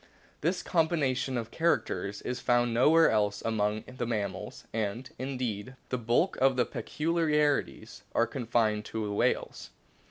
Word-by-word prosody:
This 175 +4 0
combination 140 -6 +1
of 115 -1 -4
characters 100 - 0
is 125 0 -3
found 120 -1 +2
nowhere 160 +7 +5
else 105 -1 +1
among 105 -1 0
the 125 -2 -5
mammals, 105 -4 -3
and, 110 +3 -2
indeed, 130 -3 -3
the 125 - -1
bulk 120 +11 +1
of 135 0 +4
the 125 -1 +2
peculiarities 150 - 0
are - - +4
confined 110 -3 0
to 110 -1 -3
the 105 - -3
whales. - - -1
120 Hz, 135 wpm, -29 LUFS, 110-140 Hz, -, nowhere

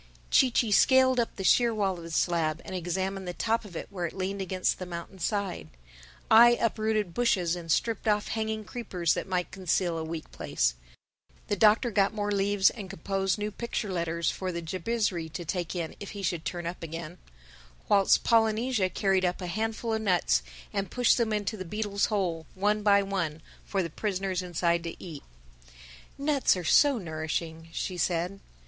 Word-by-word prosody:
Chee 260 - +5
Chee 230 -2 +1
scaled 260 +3 +5
up 235 - -1
the 195 - -5
sheer 235 +5 +4
wall 195 -3 0
of 170 - -9
the 165 - -8
slab 165 -1 0
and - - -7
examined 190 +2 -2
the 175 - -4
top 230 +1 0
of 195 -5 -12
it - - -4
where 180 -3 -2
it - - -10
leaned 195 +1 -2
against 185 -1 -1
the 185 - -4
mountain's 170 +1 -7
side; 200 - -2 0.6
I 235 +2 +9
uprooted 215 -4 0
bushes 185 -8 +1
and 165 -2 -5
stripped 225 +3 0
off 210 -1 +1
hanging 220 -1 -2
creepers 185 -9 -1
that - - -4
might 180 -2 -1
conceal 180 -2 0
a - - -3
weak 160 0 -6
place; - - 0 0.8
the 205 - +2
Doctor 215 +4 +4
got 200 0 +2
more 205 -1 -1
leaves 200 -1 +3
and 200 -5 -8
composed 195 +2 -1
new 210 0 -3
picture 215 -2 -3
letters 170 -1 0
for 185 -1 -4
the 170 -1 -5
Jabizri 185 -1 -1
to 175 -3 -5
take 175 +1 -3
in 170 -2 -4
if 205 - -7
he 200 - -6
should 170 -2 -2
turn 175 -1 -4
up 170 +2 -5
again; 165 +1 -7 0.7
whilst 200 -2 +4
Polynesia 225 -2 +2
carried 190 0 +1
up 180 0 0
a 185 - -5
handful 220 +5 -2
of 220 - -1
nuts 185 -5 +2 0.3
and 200 -1 -2
pushed 245 -1 +3
them 230 -2 +1
into 210 +1 -1
the 190 - -5
beetle's 205 +2 -1
hole, 175 -7 -1
one 210 +2 +1
by 200 -1 +4
one, 175 -6 -2 0.2
for 195 -2 -1
the 170 - -4
prisoners 190 -1 -2
inside 170 -1 0
to 170 - -5
eat. 160 -5 -8 1.0
"Nuts 280 -7 +2
are 180 - -4
so 280 - +5
nourishing," 160 -2 -4
she 180 +2 -3
said. 175 +3 -1
190 Hz, 185 wpm, -28 LUFS, 170-215 Hz, 1.0 s, I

